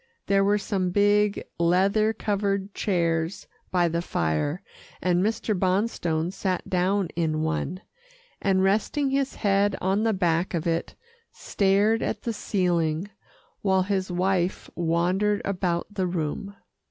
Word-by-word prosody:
There 195 0 +3
were 205 +1 +3
some 195 -3 -1
big, 205 +2 +2 0.2
leather 195 +6 +3
covered 200 -2 -1
chairs 170 -3 -1 0.2
by 175 -2 +2
the 170 0 -1
fire, 115 - -1 0.4
and 180 -1 +1
Mr. 215 +1 0
Bonstone 185 -4 0
sat 185 -2 -2
down 185 0 +1
in 155 -2 0
one, 165 +3 -2 0.6
and 190 -1 +2
resting 220 +8 +1
his 275 0 0
head 200 -1 +2
on 190 +3 +1
the 225 0 +2
back 175 -1 0
of 165 0 -2
it, 165 0 -1 0.4
stared 205 +3 +1
at - - -3
the 230 - -2
ceiling, 175 -3 0 0.5
while 190 -2 +2
his 190 -1 -1
wife 180 0 0
wandered 180 +5 +1
about 180 -3 -1
the 190 -3 -1
room. 180 +4 -3
190 Hz, 130 wpm, -25 LUFS, 175-205 Hz, 0.6 s, There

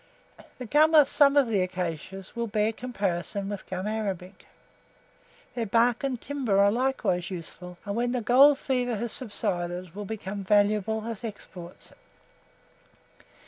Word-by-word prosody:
The 250 - -7
gum 310 +6 +4
of 300 -2 +7
some 285 -1 +4
of 280 -3 +5
the 210 -4 +1
acacias 185 +1 -5
will 235 0 -2
bear 215 +1 0
comparison 200 -4 -2
with 205 -2 -6
gum 185 +1 -4
arabic. 195 -4 -4 1.1
Their 235 -3 -3
bark 235 +4 +2
and 260 -3 -2
timber 255 -9 -1
are 200 0 +5
likewise 225 -8 0
useful, 180 0 -8
and 200 0 -3
when 240 +1 0
the 250 -1 -1
gold 270 +5 +6
fever 250 -3 -1
has 230 +2 -3
subsided, 180 -6 -3
will 205 +1 -6
become 200 -1 -5
valuable 210 +2 +2
as 230 -2 -6
exports. 185 -5 -9
210 Hz, 140 wpm, -27 LUFS, 190-245 Hz, 1.1 s, of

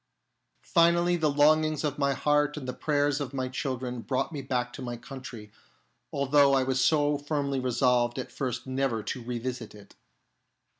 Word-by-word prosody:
Finally, 170 +1 +3
the 160 -3 +1
longings 155 +1 +3
of 145 -1 -2
my 140 -1 +2
heart 150 +2 +1
and 135 -4 -6
the 125 - -3
prayers 145 0 0
of 140 -1 -5
my 130 -1 -1
children 130 -2 -4
brought 130 +2 -2
me 145 -3 -5
back 125 -2 -2
to - - -8
my 120 -1 -5
country, 120 -5 -10 0.6
although 140 0 +4
I 135 - +3
was 130 0 +1
so 145 -2 +2
firmly 145 -2 -1
resolved 125 -1 +1
at 130 - -5
first 130 -4 -3
never 130 -4 -1
to 115 +5 -4
revisit 120 -1 -5
it. 100 -1 -15
135 Hz, 165 wpm, -28 LUFS, 125-145 Hz, 0.6 s, although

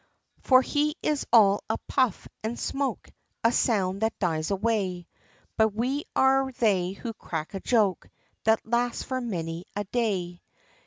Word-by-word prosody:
For 255 -1 +5
he 300 +2 0
is 300 -2 0
all 205 -4 +5
a 220 - 0
puff, 255 -7 +1 0.2
and 225 +2 -3
smoke, 275 0 -3 0.3
A 230 - +5
sound 195 -5 +1
that 220 0 0
dies 160 -4 -1
away; 195 -3 -1 0.5
But 220 -2 +3
we 260 +6 -1
are 265 0 +3
they 190 -6 +1
who 230 +3 -6
crack 160 -5 -5
a 195 - -3
joke, 205 -5 +1 0.3
That 220 0 +2
lasts 240 +1 0
for 260 -1 -3
many 170 -6 -4
a 205 - -1
day. 190 -5 -2
220 Hz, 150 wpm, -27 LUFS, 190-245 Hz, 0.5 s, For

